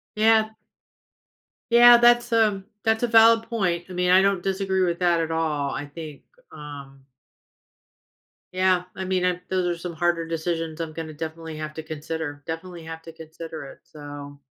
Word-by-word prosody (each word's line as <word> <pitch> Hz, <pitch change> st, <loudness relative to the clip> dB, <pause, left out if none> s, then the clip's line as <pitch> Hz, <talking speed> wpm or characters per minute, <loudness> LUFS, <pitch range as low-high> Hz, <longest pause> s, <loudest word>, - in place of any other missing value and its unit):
Yeah. 220 Hz, 0 st, +4 dB, 1.2 s
Yeah, 240 Hz, +1 st, +9 dB
that's 240 Hz, 0 st, +4 dB
a 215 Hz, -4 st, +2 dB, 0.2 s
that's 220 Hz, +1 st, +1 dB
a -, -, +3 dB
valid 225 Hz, 0 st, +5 dB
point, 180 Hz, -7 st, -1 dB
I -, -, -6 dB
mean, 180 Hz, 0 st, 0 dB
I 185 Hz, +1 st, +6 dB
don't 195 Hz, -2 st, +1 dB
disagree 190 Hz, 0 st, 0 dB
with 175 Hz, -2 st, 0 dB
that 175 Hz, -2 st, +2 dB
at 165 Hz, 0 st, -2 dB
all, 155 Hz, -3 st, -1 dB
I 145 Hz, -, -5 dB
think, 150 Hz, -1 st, -10 dB, 0.3 s
um 140 Hz, -2 st, -11 dB, 1.5 s
Yeah, 185 Hz, -1 st, +2 dB
I 190 Hz, -, -5 dB
mean, 185 Hz, -1 st, 0 dB
I 180 Hz, -1 st, 0 dB
those 185 Hz, -1 st, 0 dB
are 175 Hz, -1 st, -2 dB
some 170 Hz, 0 st, -6 dB
harder 170 Hz, 0 st, 0 dB
decisions 165 Hz, -1 st, -3 dB
I'm 160 Hz, -1 st, -4 dB
gonna 155 Hz, -1 st, -7 dB
definitely 160 Hz, +1 st, -7 dB
have 155 Hz, 0 st, -5 dB
to 160 Hz, -, -6 dB
consider, 155 Hz, -1 st, -6 dB
definitely 165 Hz, +1 st, -7 dB
have 160 Hz, 0 st, -7 dB
to 165 Hz, -, -10 dB
consider 160 Hz, -1 st, -9 dB
it, 135 Hz, -, -12 dB
so 145 Hz, -1 st, -10 dB
170 Hz, 170 wpm, -24 LUFS, 160-190 Hz, 1.5 s, Yeah